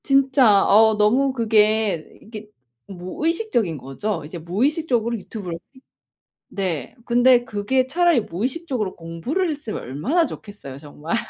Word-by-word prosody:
진짜 265 -7 +4
어 220 +1 +5
너무 245 +6 +3
그게 215 -6 +1
이게 215 -1 -10 0.4
무의식적인 220 - -2
거죠. 155 +7 -4
이제 160 +4 -8
무의식적으로 235 - 0
유튜브를 190 -4 -7 0.2
히 260 - -19 0.7
네 185 -6 -3
근데 245 +1 +4
그게 255 +3 0
차라리 340 -1 +2
무의식적으로 245 - -3
공부를 175 - -3
했으면 285 -7 -6
얼마나 245 - 0
좋겠어요 205 - -9
정말. 150 +6 -5
220 Hz, 310 characters per minute, -22 LUFS, 185-265 Hz, 0.7 s, 어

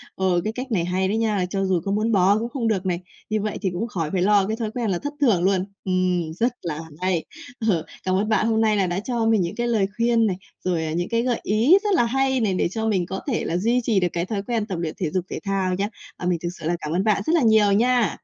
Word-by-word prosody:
ờ, 185 -2 +1
cái 215 - -2
cách 255 +1 -6
này 175 -5 +1
hay 185 +1 0
đấy 215 +3 0
nha, 210 -5 +1
cho 195 0 -1
dù 185 -3 +1
có 195 - -1
muốn 215 +3 +1
bỏ 200 +1 +4
cũng 235 +1 -3
không 240 -4 -2
được 195 -4 0
này, 175 -2 0 0.3
như 215 -1 0
vậy 210 0 -3
thì 190 - 0
cũng 225 +7 -2
khỏi 165 -8 -3
phải 185 -2 0
lo 200 0 +4
cái 220 +1 -2
thói 220 -2 -3
quen 235 -3 -2
là 180 - 0
thất 290 0 -5
thưởng 200 -10 +3
luôn. 190 -1 +2 0.2
Ừm, 180 -3 0
rất 235 +8 +1
là 155 -3 -4 0.2
hay! 185 -3 0 0.4
Ờ, 165 -5 +1 0.2
Cảm 185 0 +1
ơn 210 +3 0
bạn 220 0 +2
hôm 225 0 +2
nay 215 -1 +3
là 190 -2 +2
đã 175 +2 -1
cho 235 +1 -1
mình 220 -3 +3
những 175 +4 -2
cái 240 +1 -1
lời 215 -5 +2
khuyên 230 -1 +3
này, 185 - 0 0.3
rồi, 170 -3 0
à, 155 - -3
những 175 +3 -2
cái 230 0 +1
gợi 245 -2 0
ý 230 - +5
rất 410 -2 +1
là 240 - +4
hay 265 +1 +1
này 210 -4 +1
để 180 - +1
cho 220 +1 -2
mình 190 -5 +1
có 190 +2 -4
thể 245 - 0
là 170 - -1
duy 235 +6 +2
trì 220 -5 +2
được 180 - +2
cái 170 +1 -1
thói 200 0 -3
quen 225 -1 -1
tập 190 -5 -4
luyện 160 -2 -3
thể 170 -5 -1
dục 185 -1 -1
thể - - -4
thao 190 -2 0
nhé. 200 +2 -1 0.3
À, 180 - -6
mình 175 -2 +1
thực 170 - -1
sự - - -8
là 175 - +1
cảm 150 - -5
ơn 185 +3 +1
bạn 215 -2 +2
rất 320 - +1
là 320 - +3
nhiều 220 -3 +5
nha! 235 -1 +2
200 Hz, 295 wpm, -23 LUFS, 180-225 Hz, 0.4 s, ý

